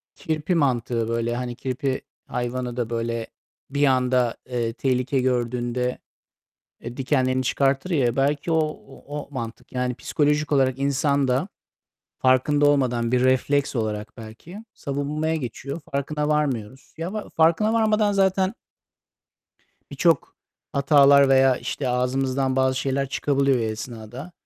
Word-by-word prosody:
Kirpi 160 +3 -2
mantığı 120 -6 +1
böyle. 115 0 -1
Hani 120 -1 -4
kirpi 130 +1 -2 0.3
hayvanı 125 0 -3
da 120 -2 -1
böyle 115 -1 -2 0.4
bir 145 +1 +2
anda, 125 -2 +2
eee, 115 -2 -1
tehlike 130 +1 0
gördüğünde, 125 0 -1 0.8
eee, 120 +1 -8
dikenlerini 130 -1 +1
çıkartır 135 +6 +1
ya, 125 -7 +1
belki 145 +4 +1
o 160 - +3 0.3
o - - -15
o 145 - -7
mantık. 115 -4 -7
Yani, 125 -1 -1
psikolojik 150 +2 0
olarak 130 -2 +2
insan 140 0 +1
da 130 +10 +1 0.7
farkında 140 +3 +3
olmadan 125 -4 +2
bir 125 0 +3
refleks 140 +2 +2
olarak 105 -1 -3
belki 120 - -10
savunmaya 150 +3 -2
geçiyor, 140 +3 -5
farkına 150 +2 -1
varmıyoruz. 135 -5 -2
Ya, 170 +4 -4
va 215 -1 -5
farkına 165 +7 +3
varmadan 215 -2 +2
zaten 190 +1 +2 1.4
birçok 165 -5 +1 0.4
hatalar 140 0 +6
veya 135 -1 +5
işte 130 +2 -3
ağzımızdan 130 +1 0
bazı 130 0 +2
şeyler 135 0 -1
çıkabiliyor 140 -2 +1
o - - -1
esnada. 110 +6 -6
130 Hz, 130 wpm, -24 LUFS, 125-145 Hz, 1.4 s, hatalar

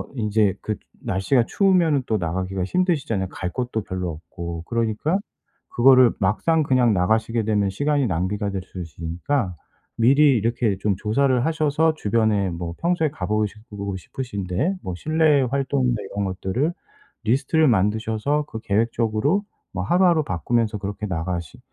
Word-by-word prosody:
인제 105 -4 +1
그 105 - -2 0.3
날씨가 115 +6 +1
추우면은 175 -8 +3
또 110 - 0
나가기가 95 +2 -2
힘드시잖아요, 140 - 0
갈 90 -1 -5
곳도 120 -3 -2
별로 90 -2 -4
없고. 85 +1 -7
그러니까 115 - 0 0.5
그거를 130 0 +6
막상 115 - +2
그냥 125 -5 +3
나가시게 110 +5 +1
되면 105 -2 +1
시간이 145 +7 0
낭비가 100 +3 -1
될 95 -1 -3
수 95 0 -9
있으니까 85 - -3 0.4
미리 135 +3 +5
이렇게 115 -2 0
좀 100 -1 0
조사를 125 +4 +1
하셔서 155 0 +2
주변에 105 -6 +1
뭐 85 0 -5
평소에 170 -2 +1
가 - - -5
보고 105 0 +1
시고 105 -2 -7
싶으신 100 0 -6
데, 145 - 0
뭐 90 - -4
실내 155 - +3
활동이나 135 -2 0 0.2
이런 100 0 -2
것들을 95 - -1 0.5
리스트를 140 +7 +2
만드셔서 110 +7 +1
그 110 - -6
계획적으로 115 - +1 0.3
뭐 90 - -2
하루하루 175 - +3
바꾸면서 110 +5 0
그렇게 100 +1 -5
나가시 85 -2 -4
110 Hz, 350 characters per minute, -23 LUFS, 95-140 Hz, 0.5 s, 그거를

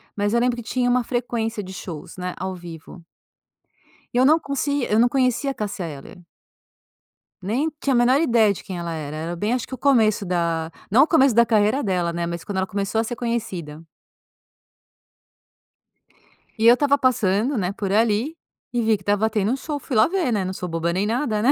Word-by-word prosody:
mas 205 +1 0
eu 235 - +3
lembro 245 0 +1
que 240 - -6
tinha 245 +2 0
uma 250 0 +2
frequência 230 -3 -2
de 190 0 -9
shows, 175 -2 -8
né, 180 0 -4
ao 190 +1 -4
vivo. 170 0 -11 1.1
E - - -1
eu 255 - +5
não 305 +3 +6 0.5
eu 215 - +3
não 240 - +5
conse - - -4
conhecia 260 +1 +1
a - - -5
Cassia 205 -6 -4
Eller 150 +5 -10 1.2
nem 245 +12 0
tinha 275 - +1
a - - +2
menor 250 +3 +4
ideia 230 -8 +4
de - - -10
quem 185 - -6
ela 170 -1 -4
era 155 -2 -5
era 165 +3 -4
bem 210 +7 -1
acho 250 -2 -1
que - - -10
o - - -4
começo 225 -6 +3
da, 170 -3 -1 0.2
não 245 +7 +6
o - - +1
começo 275 -6 +4
da 235 +2 +5
carreira 220 +4 +2
dela, 180 -6 0
né, 170 0 -2
mas, 170 0 -5
quando 200 +1 -5
ela 190 0 0
começou 200 +3 -2
a - - +2
ser 235 +2 -4
conhecida. 195 -11 -4 2.8
E 225 - +4
eu 235 - +9
estava 285 +2 +2
passando, 240 -1 +1
né, 185 -3 -1
por 200 -1 -4
ali, 225 +7 +1 0.4
e 240 - +1
vi 220 -1 +2
que 195 - -19
estava 205 +3 +1
tendo 210 -2 0
um - - +1
show 290 +2 -5
,fui 265 - -5
lá 215 - +5
ver 365 -6 0
né. 205 -3 0
Não 185 - -3
sou 180 - -5
boba 165 0 -1
nem 190 +4 0
nada, 225 -2 0
né. 250 +5 +4
215 Hz, 210 wpm, -22 LUFS, 185-245 Hz, 2.8 s, eu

